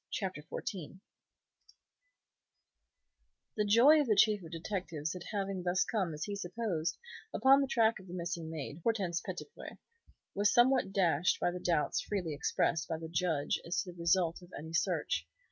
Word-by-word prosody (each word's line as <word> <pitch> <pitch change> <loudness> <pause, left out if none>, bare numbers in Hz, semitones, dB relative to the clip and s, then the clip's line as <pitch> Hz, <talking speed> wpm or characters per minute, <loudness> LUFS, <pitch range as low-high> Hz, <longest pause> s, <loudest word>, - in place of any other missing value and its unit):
CHAPTER 185 -7 -3
XIV 185 +1 -6 2.6
The 210 - +1
joy 250 +9 +6
of 285 - -1
the 215 - +3
Chief 210 0 +4
of 165 - -9
Detectives 165 -2 -4
at 180 - -7
having 195 -2 -2
thus 180 +1 +2
come, 190 -8 -1
as 150 - -4
he 205 - -3
supposed, 180 -4 -2 0.3
upon 270 +4 +5
the 275 - 0
track 230 -4 +2
of 190 - -14
the 180 - -7
missing 170 -2 -4
maid, 155 -1 -6
Hortense 190 -5 0
Petitpré, 440 - -8 0.6
was 205 +1 +2
somewhat 245 -4 +4
dashed 180 -3 +2
by 175 - +1
the 180 - -5
doubts 170 -4 +1
freely 180 -7 -3
expressed 160 +2 0
by 160 - -2
the 160 0 -7
Judge 160 -3 0
as 170 0 -2
to 180 - -8
the 175 - -16
result 170 0 +2
of 175 0 -15
any 160 +2 -8
search. 165 - 0
180 Hz, 165 wpm, -33 LUFS, 165-210 Hz, 2.6 s, joy